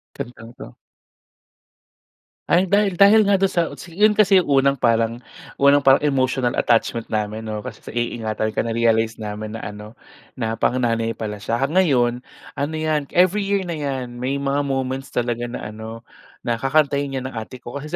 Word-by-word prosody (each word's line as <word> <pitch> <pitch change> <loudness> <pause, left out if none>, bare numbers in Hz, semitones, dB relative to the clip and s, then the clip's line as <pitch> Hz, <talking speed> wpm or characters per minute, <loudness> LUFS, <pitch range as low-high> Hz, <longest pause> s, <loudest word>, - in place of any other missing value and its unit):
Kantang 115 -1 -8
'to. - - -11 1.7
Ay 180 +2 +3
dahil 200 -2 +1
dahil 210 +2 +7
nga 200 -1 +3
do'n 195 - +3
sa 170 -3 -1
utsi 170 -1 -11
'yon 210 +2 +5
kasi 195 -3 +4
unang 140 -2 +3
parang 115 -1 +1 0.3
unang 140 +1 +5
parang 135 0 +4
emotional 130 -3 +1
attachment 115 -1 +1
namin 110 0 -3
oo, 105 -1 -4
kasi - - -8
sa - - -25
iingatan 110 -2 -2
ka - - -4
na-realize 115 -1 +1
namin 105 0 -6
na 115 - -7
ano, 105 +2 -8 0.4
na 115 -2 -3
pang-nanay 115 -2 0
pala 105 -2 -5
siya 110 +3 -2
ah, 140 - 0
ngayon, 130 -10 +2 0.4
ano 145 +3 -2
'yan 155 -2 -1
every 185 +3 +3
year 200 -1 +1
na 170 -3 -5
'yan, 130 -4 -4
may 130 +2 -1
mga 140 0 -1
moments 135 0 -2
talaga 120 0 -2
na 120 - -7
ano, 110 +2 -9 0.4
na 115 -1 -1
kakantahin 140 0 +1
'yan 130 0 -4
ng - - -13
ate 125 +3 -10
ko, 120 +4 -6
kasi 150 +2 -6
130 Hz, 175 wpm, -21 LUFS, 115-150 Hz, 1.7 s, dahil